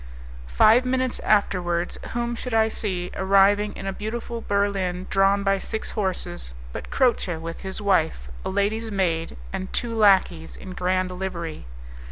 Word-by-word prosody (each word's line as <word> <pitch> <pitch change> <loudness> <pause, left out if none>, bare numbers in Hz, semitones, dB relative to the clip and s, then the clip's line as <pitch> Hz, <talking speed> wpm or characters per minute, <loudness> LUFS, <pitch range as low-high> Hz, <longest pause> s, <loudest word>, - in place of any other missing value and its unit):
Five 215 - +5
minutes 255 0 0
afterwards 175 -4 +1
whom 240 0 -1
should 240 0 -3
I 220 0 +4
see, 185 -5 -3
arriving 200 +2 +4
in - - -7
a 195 - -2
beautiful 230 +3 -5
berlin 195 -3 0
drawn 195 +1 +3
by 195 0 +2
six 220 - -4
horses, 185 - -3 0.2
but - - -6
Croce 240 -9 +1
with 165 +1 -7
his 190 +2 -5
wife, 160 - +1 0.2
a - - -3
lady's 205 +4 0
maid, 170 - -1 0.2
and 190 - -4
two 240 -2 -2
lackeys 195 -6 +3
in 190 - -9
grand 185 0 0
livery. 170 - -5
195 Hz, 150 wpm, -24 LUFS, 180-215 Hz, 0.2 s, Five